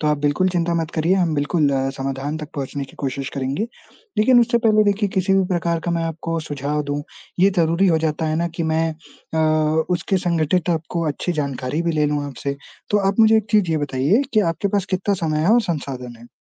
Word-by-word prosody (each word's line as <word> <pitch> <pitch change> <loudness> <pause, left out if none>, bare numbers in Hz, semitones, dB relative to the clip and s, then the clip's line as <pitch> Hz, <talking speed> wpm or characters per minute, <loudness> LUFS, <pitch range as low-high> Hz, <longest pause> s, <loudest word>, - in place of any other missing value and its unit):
तो 155 - -1
आप 150 -1 +2
बिल्कुल 145 +6 +1
चिंता 175 -1 0
मत 160 - -6
करिए, 165 +4 +2
हम 175 -4 +1
बिल्कुल 145 +1 +1 0.3
समाधान 135 +2 -3
तक 150 -1 -7
पहुँचने 140 -1 -4
की 135 - -17
कोशिश 135 0 -3
करेंगे, 135 +9 -2 0.5
लेकिन 245 +3 +6
उससे 235 0 +2
पहले 215 -2 +4
देखिए 205 0 +1
किसी 190 +1 +2
भी 195 0 +3
प्रकार 170 -2 0
का 175 - -1
मैं 170 -1 0
आपको 165 0 -3
सुझाव 145 0 -3
दूँ, 145 0 -3 0.4
ये 195 +2 +6
ज़रूरी 170 +3 +3
हो 165 -3 +3
जाता 160 0 -1
है 155 0 0
ना 170 +1 0
कि 170 - -1
मैं 160 0 +1
अ, 155 0 -1
उसके 180 +2 0
संघटित 170 +1 +1
आपको 165 0 -2
अच्छी 150 +4 -2
जानकारी 140 -1 -2
भी 170 -1 0
ले 150 -1 +2
लूँ 145 0 -1
आपसे, 140 0 -4 0.3
तो 205 - +3
आप 200 +3 +1
मुझे 220 0 +6
एक 215 -2 0
चीज़ 205 -5 +3
ये 160 - +1
बताइए 145 - +1
कि 215 - +4
आपके 200 +5 -2
पास 200 -1 0
कितना 195 +2 0
समय 155 -1 0
है 190 - +4
और 240 - +5
संसाधन 135 - -4
है? 120 - -14
160 Hz, 220 wpm, -21 LUFS, 145-185 Hz, 0.5 s, लेकिन